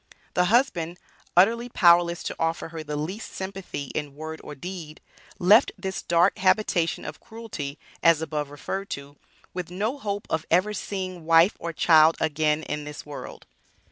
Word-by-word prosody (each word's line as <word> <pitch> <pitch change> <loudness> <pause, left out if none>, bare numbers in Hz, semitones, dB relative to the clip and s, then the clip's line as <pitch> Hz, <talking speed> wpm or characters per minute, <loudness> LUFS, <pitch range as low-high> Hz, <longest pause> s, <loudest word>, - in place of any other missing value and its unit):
The 180 - +3
husband, 180 -6 +1 0.4
utterly 230 +6 +4
powerless 170 -4 +4
to - - -4
offer 165 0 -1
her 165 -1 -6
the 150 -1 -5
least 180 +9 -5
sympathy 190 -7 -6
in 145 -2 -4
word 160 +1 -7
or 150 - -8
deed, 165 0 -8 0.4
left 205 +8 +6
this 190 -1 -4
dark 170 +3 +3
habitation 185 -3 +2
of 150 - -7
cruelty, 220 -11 -7 0.2
as 165 -2 +5
above 150 -2 -3
referred 195 +7 -5
to, 140 +1 -12 0.4
with 180 -2 -4
no 215 +10 -2
hope 205 -4 -3
of 160 -1 -1
ever 185 +5 +3
seeing 185 -5 -5
wife 165 +4 +5
or 170 - -4
child 160 0 +5
again 155 0 +1
in 150 0 -4
this 150 0 -8
world. 145 -1 -9
170 Hz, 160 wpm, -25 LUFS, 155-190 Hz, 0.4 s, left